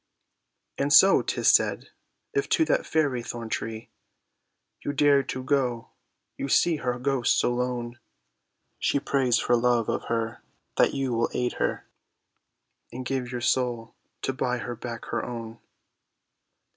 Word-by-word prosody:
And 140 +1 0
so, 190 +6 +7
'tis - - +1
said, - - +2 0.4
if 415 0 0
to 320 - +3
that - - 0
fairy 145 -6 +1
thorn 115 -1 -6
tree 110 0 -5 0.9
You 145 - -2
dare 145 -1 +4
to 130 -1 -5
go, 130 -4 -1 0.5
you 140 - -3
see 165 +3 +3
her 125 -3 -2
ghost 130 0 +1
so 120 - +2
lone, 120 -1 -3 0.8
She 140 - +1
prays 130 -4 +1
for 120 - +2
love 120 -1 +2
of - - -2
her 115 -1 -2 0.4
that - - +3
you 135 -2 -1
will 115 0 +1
aid 125 0 0
her, - - -1 1.0
And 125 +1 -6
give 130 -1 -2
your 125 -1 -4
soul 120 -2 0 0.3
to 135 - -1
buy 125 -1 -1
her 120 0 -5
back 120 0 -7
her - - -3
own. 115 -2 -7
125 Hz, 145 wpm, -26 LUFS, 120-135 Hz, 1.0 s, so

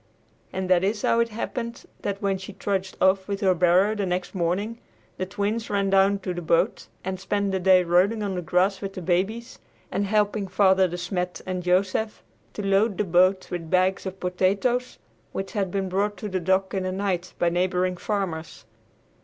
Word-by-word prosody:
And 190 0 -3
that 180 -1 +4
is 205 +2 0
how 230 - +3
it 235 0 +2
happened 235 +1 -5 0.2
that, 200 0 -3
when 195 -1 +1
she 190 +1 -8
trudged 190 -1 -3
off 190 0 +3
with 200 -1 -3
her 190 -2 +4
barrow 180 +4 +4
the 205 -3 -2
next 180 0 -2
morning, 195 +6 -1 0.4
the 185 - -3
Twins 205 +4 -2
ran 200 -1 0
down 195 +1 +4
to 185 - -3
the 175 - -5
boat 165 0 +1 0.2
and 185 0 -3
spent 200 +1 -1
the 190 - 0
day 185 0 +5
rolling 185 +6 +2
on 200 -2 -2
the 180 - -2
grass 180 +4 +1
with 195 -1 -5
the 185 - -6
babies, 195 +7 -1 0.3
and 200 - -1
helping 210 -1 +1
Father 190 0 +4
De 175 0 -5
Smet 180 0 -3
and 185 -1 -3
Joseph 185 +4 0 0.3
to 205 - -5
load 195 +1 +2
the - - +1
boat 185 +1 +3
with 165 -2 -4
bags 185 +2 +2
of 190 0 -7
potatoes 200 +8 0 0.4
which 195 0 -4
had 200 -4 -1
been 195 +1 -2
brought 200 +2 -1
to 210 +3 -5
the 190 -1 -1
dock 190 +2 +1
in 190 - 0
the 185 0 -2
night 185 -2 -2
by 175 - +2
neighboring 180 +1 0
farmers. 175 - -4
190 Hz, 195 wpm, -25 LUFS, 180-200 Hz, 0.4 s, day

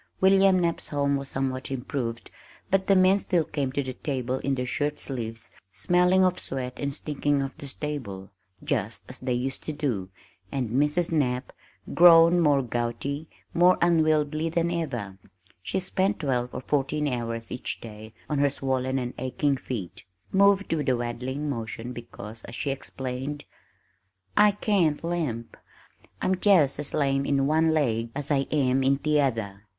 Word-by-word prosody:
William 195 0 +5
Knapp's 170 -1 -1
home 140 -1 0
was 140 -1 -1
somewhat 130 -1 -2
improved 125 -3 -4 0.4
but 195 0 +2
the 195 - +5
men 185 +1 +5
still 175 -4 +1
came 140 -3 -2
to 140 +1 -1
the 130 -1 -5
table 130 -1 -3
in 140 -1 -1
their 125 -1 -2
shirt 145 +4 -1
sleeves 115 -4 -5 0.2
smelling 180 - +3
of 185 -1 +2
sweat 130 -2 -4
and 140 0 -2
stinking 145 0 -1
of 135 -1 -3
the 140 - -7
stable, 130 -10 -5 0.3
just 105 +4 -2
as 130 - -8
they 130 0 -3
used 130 +2 -3
to - - -3
do, 125 -11 -2 0.4
and 125 -5 -2
Mrs. 150 +7 +2
Knapp 130 -5 0 0.4
grown 170 0 +7
more 145 -5 +3
gouty, 120 +6 -3 0.2
more 180 +2 +5
unwieldy 155 -2 +2
than 170 +1 0
ever 120 - -4 0.4
(she 190 - -2
spent 190 +2 0
twelve 125 -4 0
or - - -5
fourteen 145 +2 0
hours 115 -3 -3
each 125 - -4
day 110 -1 -10 0.2
on 150 -2 -1
her 140 0 +4
swollen 130 -1 -1
and 125 -1 -3
aching 140 +2 0
feet), 115 -8 -6 0.3
moved 200 -1 +4
with 150 -4 0
a 125 - +2
waddling 125 +5 -3
motion 115 -2 -4
because, 115 -2 -9
as 120 - -9
she 140 - -2
explained, 135 +1 -5 0.9
"I 210 -1 +6
can't 185 -8 +1
limp 155 -10 -3 0.7
I'm 190 - +2
just 165 -10 +4
as 145 - +2
lame 135 -2 +1
in 140 -1 +1
one 160 +3 +3
laig 115 -8 +1
as 145 +1 -3
I 135 -1 +2
am 135 -3 +2
in 135 +1 +3
t'other. 125 -10 0
140 Hz, 160 wpm, -26 LUFS, 125-155 Hz, 0.9 s, grown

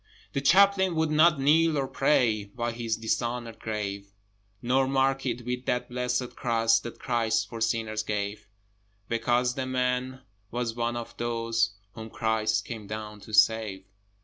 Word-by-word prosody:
The 140 - -1
Chaplain 190 +3 +4
would 160 -1 +1
not 155 0 +5
kneel 155 +3 +4
to 140 -2 0
pray 115 -6 +2
By 120 +3 -4
his 115 -1 -2
dishonoured 115 +1 -2
grave: 100 -2 -4 0.5
Nor 130 +3 +2
mark 135 0 +1
it 120 -1 -3
with 125 +1 -4
that 125 - -1
blessed 125 0 -2
Cross 115 -1 +2
That 120 0 -8
Christ 115 -2 0
for 115 -1 -8
sinners 110 -1 0
gave, 105 0 -4 0.6
Because 120 +2 +1
the 130 0 -3
man 130 0 -1 0.3
was 120 0 -2
one 120 0 -2
of 120 -1 -6
those 115 -2 0 0.2
Whom 110 0 -8
Christ 110 -1 0
came 110 -4 -7
down 105 0 -6
to 100 +2 -13
save. 105 -2 +3
120 Hz, 150 wpm, -27 LUFS, 110-130 Hz, 0.6 s, not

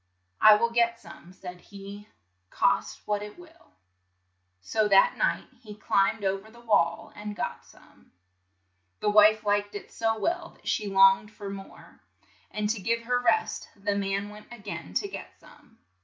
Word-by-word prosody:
"I 215 0 +9
will 235 +2 +1
get 235 0 +2
some," 175 - -14
said 180 -1 -10
he, 200 +1 -11 0.4
"cost - - +1
what 210 -1 -1
it 210 +6 -9
will." 340 -1 -18 0.9
So 215 - 0
that 195 -1 +5
night - - 0
he 210 -3 -10
climbed 205 +1 +1
o 195 0 0
ver 215 +3 -16
the 235 +2 -17
wall 205 -8 +1
and 210 0 -6
got - - -4
some. - - -22 0.9
The 210 - +1
wife 215 +1 +6
liked 205 0 0
it 205 - -8
so 225 -1 -1
well 340 +7 -2
that - - -18
she 210 - 0
longed 195 +1 +5
for 200 -2 -8
more, 195 -1 -11 0.5
and 210 0 -2
to 220 -3 -4
give 230 +3 0
her 245 +1 +1
rest 435 - 0
the 205 0 -2
man 200 0 -2
went 210 +2 -14
a 240 - -9
gain 205 -2 -8
to 405 - 0
get 390 - -10
some. - - -20
210 Hz, 170 wpm, -27 LUFS, 200-230 Hz, 0.9 s, I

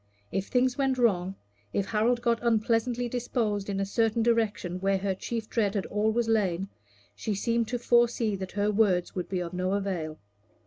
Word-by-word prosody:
If 195 +1 -2
things 255 +2 +1
went 270 -1 +2
wrong, 195 -6 +2 0.4
if 200 - 0
Harold 235 +3 +1
got 235 -1 +2
unpleasantly 235 +1 +1
disposed 225 -4 -1
in 195 -1 -1
a 195 - +1
certain 225 +2 +1
direction 215 -6 0
where 195 +1 +2
her 190 0 -1
chief 225 +3 -4
dread 215 -3 0
had 200 - -1
always 220 +3 0
lain, 195 -4 +1 0.5
she 215 - -2
seemed 230 +3 0
to 245 - -2
foresee 235 -2 +2
that 190 0 -6
her 205 +1 +1
words 195 -4 +2
would 180 - -4
be 185 -2 -1
of 175 0 -5
no 185 +1 -1
avail. 180 -6 -2
215 Hz, 180 wpm, -28 LUFS, 195-235 Hz, 0.5 s, went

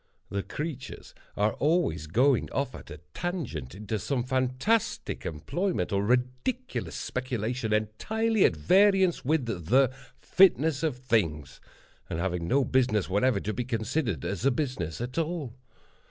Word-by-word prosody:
The 100 - -1
creatures 150 +2 -6 0.2
are 105 +1 +2
always 145 - +1
going 125 - +2
off 140 -2 -1
at - - -11
a 75 - -9
tangent 125 - -4
into 105 +1 -3
some 125 +5 -1
fantastic 130 - 0
employment, 170 - -2
or 100 0 +1
ridiculous 125 - -1
speculation, 125 -2 -3
entirely 210 - +1
at - - +3
variance 190 -3 +4
with 145 0 +1
the 115 - +2 0.3
"fitness 160 -6 +4
of 155 -6 -1
things," 105 - -1 0.5
and - - -3
having 85 -1 -2
no 135 +4 +3
business 120 -8 +1
whatever 105 +2 +2
to 110 - -3
be 125 - -2
considered 115 - -2
as 100 +2 -3
a 135 - +5
business 120 - -2
at 125 +6 -3
all. 160 -6 -3
125 Hz, 140 wpm, -28 LUFS, 105-155 Hz, 0.5 s, a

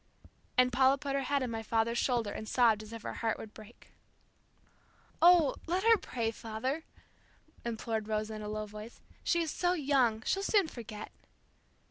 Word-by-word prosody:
And 250 0 +4
Paula 265 +2 +5
put 280 -1 -4
her 275 - +1
head 275 +1 0
on 250 - -3
my 225 -1 -3
father's 225 +1 0
shoulder 235 -5 0
and 215 - -6
sobbed 230 -4 +4
as 215 0 -11
if 230 -1 -8
her - - -4
heart 225 -2 -1
would 215 - -9
break. 220 +2 -15 1.3
"Oh, 340 -4 +7
let 360 +3 0
her 455 0 +7
pray, 235 - -2
father," 245 +8 -4 0.8
implored 225 -2 -3
Rosa 215 0 -2
in 215 - -6
a 210 - -5
low 215 0 -3
voice. 210 +2 -10 0.2
"She 340 -1 +2
is 320 - -3
so 355 0 +1
young, 265 -8 +2
she'll 390 - +1
soon 400 -2 +3
forget." 220 -6 -8
235 Hz, 175 wpm, -32 LUFS, 220-280 Hz, 1.3 s, Oh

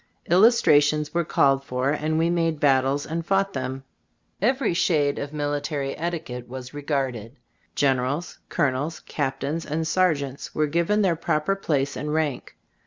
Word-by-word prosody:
Illustrations 150 -8 +4
were 170 0 +1
called 135 -3 +2
for, 130 +1 -1
and 155 +1 -1
we 165 +1 +2
made 165 -2 0
battles 135 0 +2
and 165 +1 -3
fought 195 +3 +1
them. 130 0 -4 0.6
Every 250 0 +2
shade 150 -5 +1
of 145 0 -5
military 145 -1 -2
etiquette 155 -8 -5
was 130 +1 -8
regarded. 135 -5 -3 0.4
Generals, 135 +4 0
colonels, 150 +1 -1
cap 135 -3 -3
tains 155 +4 -2
and 160 +1 -2
sergeants 155 -6 0
were 155 - +2
given 170 +7 +1
their 180 -4 +2
proper 155 +3 0
place 145 -7 -1
and 150 +3 -4
rank. 155 -4 -2
150 Hz, 145 wpm, -24 LUFS, 135-165 Hz, 0.6 s, Illustrations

